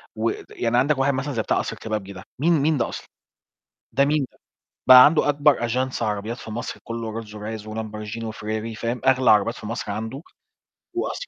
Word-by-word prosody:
ود 410 Hz, -1 st, -2 dB
يعني 120 Hz, 0 st, 0 dB
عندك 140 Hz, +3 st, +3 dB
واحد 135 Hz, +1 st, +2 dB
مثلًا 135 Hz, +2 st, -3 dB
زي 115 Hz, -, 0 dB
بتاع -, -, 0 dB
قصر -, -, -3 dB
الكبابجي 105 Hz, -3 st, -5 dB
ده، 95 Hz, 0 st, -10 dB, 0.2 s
مين 170 Hz, +4 st, +3 dB
مين 155 Hz, +1 st, +2 dB
ده 120 Hz, -, 0 dB
أصلًا؟ -, -, -8 dB, 0.8 s
ده 140 Hz, -, +3 dB
مين 145 Hz, -1 st, +1 dB
ده؟ -, -, -27 dB, 0.5 s
بقى 130 Hz, 0 st, +11 dB
عنده 150 Hz, -1 st, +3 dB
أكبر 145 Hz, -4 st, +3 dB
أجانس 125 Hz, +1 st, -1 dB
عربيات 105 Hz, +2 st, -2 dB
في 110 Hz, -, -9 dB
مصر 120 Hz, +3 st, -5 dB
كله 115 Hz, -1 st, -4 dB
Rolls-Royce 105 Hz, 0 st, -7 dB
وLamborghini 110 Hz, +1 st, -6 dB
وFerrari 110 Hz, +1 st, -4 dB
فاهم؟ 120 Hz, +1 st, -2 dB
أغلى 130 Hz, -3 st, +5 dB
عربيات 105 Hz, +2 st, +3 dB
في -, -, -10 dB
مصر 110 Hz, -1 st, -4 dB
عنده، 110 Hz, +6 st, -5 dB, 0.7 s
وقصر -, -, -3 dB
115 Hz, 185 wpm, -23 LUFS, 110-135 Hz, 0.8 s, بقى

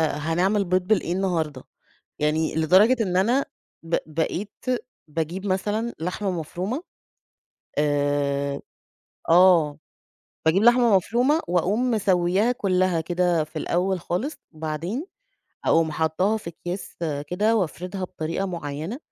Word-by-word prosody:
هنعمل 180 Hz, +7 st, +1 dB
بيض 185 Hz, +1 st, +2 dB
بالإيه 185 Hz, -5 st, +2 dB
النهارده؟ 165 Hz, -8 st, -1 dB, 0.6 s
يعني 155 Hz, +1 st, 0 dB
لدرجة 185 Hz, +10 st, +5 dB
إن 180 Hz, -2 st, 0 dB
أنا 240 Hz, +8 st, +2 dB, 0.4 s
ب 165 Hz, +1 st, 0 dB
بقيت 165 Hz, -, -4 dB, 0.4 s
باجيب 165 Hz, +5 st, -3 dB
مثلًا 210 Hz, +5 st, -1 dB
لحمة 185 Hz, +3 st, -2 dB
مفرومة، 180 Hz, -, -4 dB, 1.0 s
آآ 145 Hz, -1 st, 0 dB, 0.7 s
آه. 165 Hz, -4 st, +5 dB, 0.7 s
باجيب 185 Hz, +7 st, +4 dB
لحمة 240 Hz, -3 st, +6 dB
مفرومة، 245 Hz, -, +2 dB
وأقوم 200 Hz, +8 st, +1 dB
مسويّاها 190 Hz, +1 st, +2 dB
كلّها 185 Hz, -6 st, +1 dB
كده 175 Hz, -1 st, +1 dB
في 155 Hz, +1 st, -15 dB
الأول 185 Hz, +3 st, 0 dB
خالص، 215 Hz, -, -2 dB, 0.2 s
وبعدين، 160 Hz, -, -4 dB, 0.6 s
أقوم 160 Hz, -1 st, +3 dB
حاطّاها 160 Hz, +8 st, +1 dB
في 190 Hz, -6 st, -6 dB
أكياس 175 Hz, +3 st, -7 dB, 0.3 s
كده، 210 Hz, +7 st, +1 dB
وأفردها 185 Hz, +1 st, -3 dB
بطريقة 170 Hz, +3 st, -3 dB
مُعيّنة، 165 Hz, -, -5 dB
180 Hz, 110 wpm, -24 LUFS, 160-205 Hz, 1.0 s, لحمة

